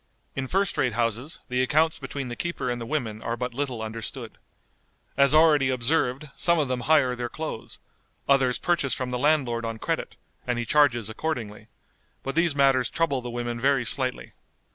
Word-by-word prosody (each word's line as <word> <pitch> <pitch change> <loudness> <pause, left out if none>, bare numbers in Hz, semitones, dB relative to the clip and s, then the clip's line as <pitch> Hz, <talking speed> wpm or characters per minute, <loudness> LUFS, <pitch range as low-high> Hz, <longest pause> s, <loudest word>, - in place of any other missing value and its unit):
In 135 -1 -3
first 195 +5 0
rate 125 -3 +1
houses 120 +5 -1
the 125 0 0
accounts 155 +5 +2
between 135 -1 -5
the 120 - -5
keeper 170 -6 -2
and 120 0 -4
the 115 - -5
women 115 -7 -3
are 115 +1 -3
but 125 0 -3
little 130 -4 -3
understood. 115 +2 -5 0.8
As 140 0 +5
already 155 -3 +5
observed, 130 +2 0
some 170 0 +2
of 150 -3 +1
them 130 -1 -1
hire 130 -2 +3
their 120 -1 -4
clothes; 155 -5 -6 0.5
others 135 -3 +3
purchase 170 -6 +1
from 125 -1 -4
the 125 - -2
landlord 130 -5 +1
on 115 -1 -3
credit, - - -3 0.3
and 125 -1 0
he 120 - -2
charges 120 -4 +3
accordingly; 110 -4 -4 0.6
but 135 - -3
these 170 -2 +2
matters 135 -3 +3
trouble 150 -6 0
the 120 - -6
women 120 0 -3
very 135 -1 +2
slightly. 130 +1 -1
130 Hz, 180 wpm, -26 LUFS, 120-145 Hz, 0.8 s, As